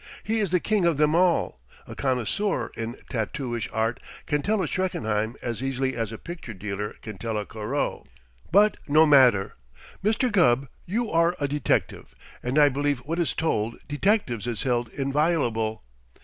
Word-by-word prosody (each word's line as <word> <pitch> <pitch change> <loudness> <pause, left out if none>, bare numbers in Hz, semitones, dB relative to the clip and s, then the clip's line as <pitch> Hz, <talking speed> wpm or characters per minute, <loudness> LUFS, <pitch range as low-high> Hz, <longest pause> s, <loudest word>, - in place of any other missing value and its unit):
He 225 +1 0
is 205 -3 +1
the 180 +1 +2
king 210 +1 +1
of 170 -4 +2
them 150 +1 +3
all. 170 - +2 0.3
A - - -9
connoisseur 130 - -1
in 115 +2 -4 0.2
tattooish 120 0 -3
art 110 +2 0 0.3
can 145 0 0
tell 210 +3 +1
a - - -1
Schreckenheim 110 - -1
as 120 -2 -3
easily 135 0 -1
as 115 -2 -2
a 115 - -6
picture 165 -9 -8
dealer 100 +1 -4
can 105 -4 -8
tell 110 0 -2
a 105 - -2
Corot. 115 +7 -3 0.4
But 205 +4 +5
no 155 +2 +6
matter! 125 -10 +5 0.5
Mr. 225 +4 +2
Gubb, 140 -9 +3 0.2
you 225 +5 -1
are 170 +1 +3
a 145 - 0
detective 145 -2 -1 0.3
and 125 +4 -2
I 150 -1 +7
believe 145 0 0
what 165 +3 -2
is 170 - 0
told 115 -8 0
detectives 145 - 0
is 120 -2 -3
held 120 -2 0
inviolable. 135 -6 0
140 Hz, 165 wpm, -25 LUFS, 115-170 Hz, 0.5 s, I